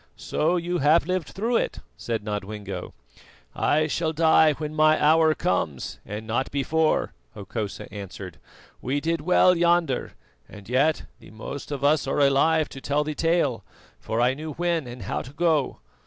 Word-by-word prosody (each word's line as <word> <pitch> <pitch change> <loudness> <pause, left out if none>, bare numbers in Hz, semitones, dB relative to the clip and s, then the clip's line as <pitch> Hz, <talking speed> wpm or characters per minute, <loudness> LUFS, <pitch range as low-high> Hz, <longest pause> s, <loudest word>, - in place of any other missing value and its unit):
"So 165 +4 0
you 175 +1 -2
have 150 +3 +4
lived 185 -2 -2
through 230 +5 -1
it," - - -2 0.2
said 115 -3 -4
Nodwengo. 105 - -5 0.6
"I 155 +1 +2
shall 160 +1 -1
die 160 -1 +5
when 150 +1 -5
my 155 0 +4
hour 155 +1 +4
comes, 80 - -2
and 105 +2 -7
not 120 +4 -1
before," 155 +3 0 0.2
Hokosa 100 0 -5
answered. 95 -3 -8 0.4
"We 135 +3 -1
did 165 +1 -1
well 180 +2 +4
yonder, 170 -5 +1 0.4
and 100 -1 -12
yet 140 +6 +2 0.2
the - - -15
most 115 +7 -8
of 140 -1 -4
us 145 -1 +3
are 135 - 0
alive 145 +3 +3
to 135 - -10
tell 145 +2 0
the 155 0 -4
tale, 150 - 0 0.4
for 110 - -3
I 125 +2 +3
knew 155 +2 -6
when 170 -3 -1
and 120 +1 -8
how - - -3
to 130 - -11
go. 155 -4 +1
150 Hz, 165 wpm, -25 LUFS, 120-160 Hz, 0.6 s, die